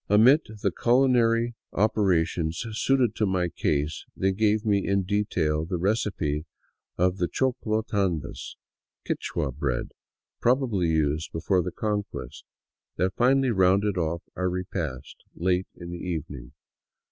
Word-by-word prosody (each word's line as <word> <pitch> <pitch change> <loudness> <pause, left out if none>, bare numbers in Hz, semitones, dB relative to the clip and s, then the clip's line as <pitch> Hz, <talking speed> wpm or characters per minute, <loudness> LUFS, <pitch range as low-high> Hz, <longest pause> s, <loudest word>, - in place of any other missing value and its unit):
Amid 125 +10 +6 0.2
the 100 - +2
culinary 120 0 +3 0.2
operations 90 -4 +1
suited 125 0 +2
to 105 - +2
my 90 -2 0
case 75 -1 -1
they 95 +1 +2
gave 105 +2 +1
me 100 -2 +2
in 100 -1 +2
detail 90 -6 0
the 90 +2 -3
recipe 85 -6 -1 0.5
of 90 +1 +2
the 90 - 0
choclo 110 0 -1
tandas 95 -9 -2 0.3
— - - -60
Quichua 70 - -2
bread, - - -2 0.5
probably 120 -8 +2
used 80 -1 0
before 90 +3 +1
the 90 +1 -4
Conquest 105 0 -4 0.2
— - - -65
that 95 0 +1
finally 130 +1 +3
rounded 95 +1 +3
off 85 -1 -1
our 90 0 0
repast 85 -8 -4 0.2
late 90 +1 0
in 85 -1 -8
the 85 - -6
evening. 75 -8 -5
95 Hz, 135 wpm, -26 LUFS, 85-110 Hz, 0.5 s, Amid